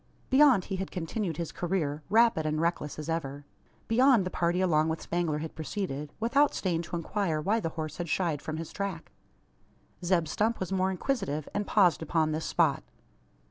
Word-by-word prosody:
Beyond 265 -8 +6
he 190 - -3
had 190 0 -4
continued 175 0 -3
his 170 -2 -3
career; 165 -5 -2
rapid 225 -5 +4
and 155 0 -1
reckless 165 -3 -1
as 155 -1 -6
ever. 145 -4 -3 0.4
Beyond 245 -3 +4
the 185 - -3
party 175 +1 0
along 160 -4 +2
with 160 0 -3
Spangler 170 -3 -1
had 160 +1 -5
proceeded 155 -4 -4
without 275 +6 +3
staying 170 -4 0
to 170 - -6
inquire 170 -1 -1
why 200 +9 +1
the 165 - -2
horse 155 -1 -4
had 170 -2 -4
shied 160 -4 0
from 155 +1 -4
his 165 0 -6
track. 195 -5 -4 0.9
Zeb 175 -2 +2
Stump 220 +8 0
was 185 0 -4
more 190 0 +1
inquisitive, 190 - -2
and 205 0 -2
paused 185 -6 +4
upon 160 0 +1
this 155 +1 -2
spot. - - +2
170 Hz, 180 wpm, -29 LUFS, 155-200 Hz, 0.9 s, Beyond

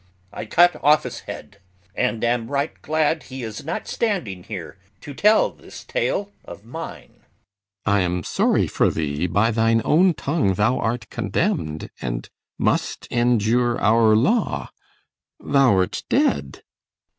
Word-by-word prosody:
I 110 - -6
cut 175 +8 +4
off's 150 +1 +3
head, 100 - -10 0.3
And 120 -1 -1
am 120 -1 0
right 140 +2 -1
glad 155 +1 0
he 130 -1 -8
is 110 -2 -6
not 160 - -4
standing 175 - -2
here 95 -1 -8 0.2
To 145 - -8
tell 210 +9 +4
this - - -13
tale 205 - -2
of 100 - -11
mine. 160 +8 -9
CYMBELINE. - - -35 0.6
I 100 -1 +3
am 90 -2 -1
sorry - - +1
for - - +1
thee. 75 +2 -2
By 100 +7 +2
thine 115 0 +2
own 175 +2 +4
tongue 140 - 0
thou 110 +6 +1
art 115 -1 -2
condemn'd, 80 -1 -2
and - - -4 0.3
must - - -1
Endure 120 0 +2
our 110 0 +4
law. 180 - +1 0.7
Thou'rt 125 -10 +2
dead. 70 -1 0
115 Hz, 135 wpm, -22 LUFS, 100-145 Hz, 0.7 s, cut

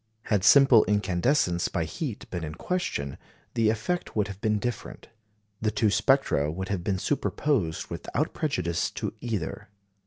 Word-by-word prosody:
Had 105 -4 0
simple 135 +1 +7
incandescence 95 -1 +1
by 85 - -1
heat 110 - -5
been 90 -2 -3
in 75 -1 -5
question, 125 - -3 0.3
the 115 -2 +3
effect 115 +12 -2
would 105 -2 +1
have 100 0 -8
been 110 -1 +1
different; 120 +3 -5 0.5
the 110 - +2
two 105 0 +1
spectra 110 - +2
would 95 +3 -5
have 95 -3 -2
been 95 0 0
superposed 110 - -1
without 90 - -2
prejudice 90 - -1
to - - -4
either. 105 -7 -4
105 Hz, 150 wpm, -27 LUFS, 90-125 Hz, 0.5 s, simple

